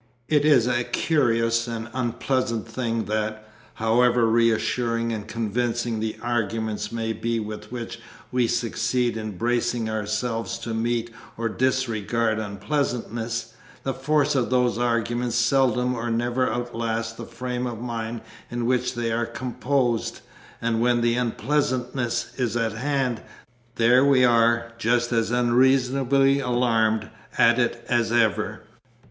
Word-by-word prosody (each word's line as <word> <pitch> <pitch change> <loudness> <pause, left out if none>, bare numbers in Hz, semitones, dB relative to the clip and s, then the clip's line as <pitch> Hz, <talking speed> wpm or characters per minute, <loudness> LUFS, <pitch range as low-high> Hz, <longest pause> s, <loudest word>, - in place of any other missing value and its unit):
It 150 -1 +3
is 140 -7 +5
a 120 -1 +1
curious 115 -6 +1
and 115 -1 -4
unpleasant 120 -1 -1
thing 115 -1 -2
that, 110 0 -2 0.3
however 120 +2 +3
reassuring 115 +1 +1
and 105 -1 -5
convincing 115 +1 -1
the 110 0 -3
arguments 110 -2 -2
may 115 -1 -2
be 115 +2 -2
with 105 0 -7
which 115 -1 -6 0.3
we 125 -2 +2
succeed 120 +1 0
in 110 -4 -5
bracing 120 0 0
ourselves 110 +2 -2
to 115 - -5
meet 115 +1 -1 0.3
or 115 0 -1
disregard 115 -3 0
unpleasantness, 115 +1 -3 0.3
the 135 - -1
force 145 +2 +1
of 130 -4 +1
those 125 -2 +2
arguments 120 0 0
seldom 125 0 +2
or 120 -1 -3
never 120 +2 0
outlasts 115 -1 -2
the 115 0 -9
frame 125 +1 -3
of 115 -3 -5
mind 115 -1 -4 0.3
in 120 -1 -3
which 125 0 +1
they 120 -1 -1
are 115 0 0
composed, 125 0 -1 0.4
and 115 -1 0
when 120 0 +3
the 120 0 +2
unpleasantness 125 0 -1
is 120 -3 0
at 115 -1 0
hand, 130 -1 -1 0.5
there 120 +3 +5
we 135 -2 +5
are, 115 0 +3
just 120 +1 +1
as 115 -2 +1
unreasonably 130 +3 +3
alarmed 115 -4 +1 0.3
at 120 +1 +5
it 120 -1 -1
as 120 -2 +1
ever. 115 -3 +1
120 Hz, 130 wpm, -24 LUFS, 115-125 Hz, 0.5 s, is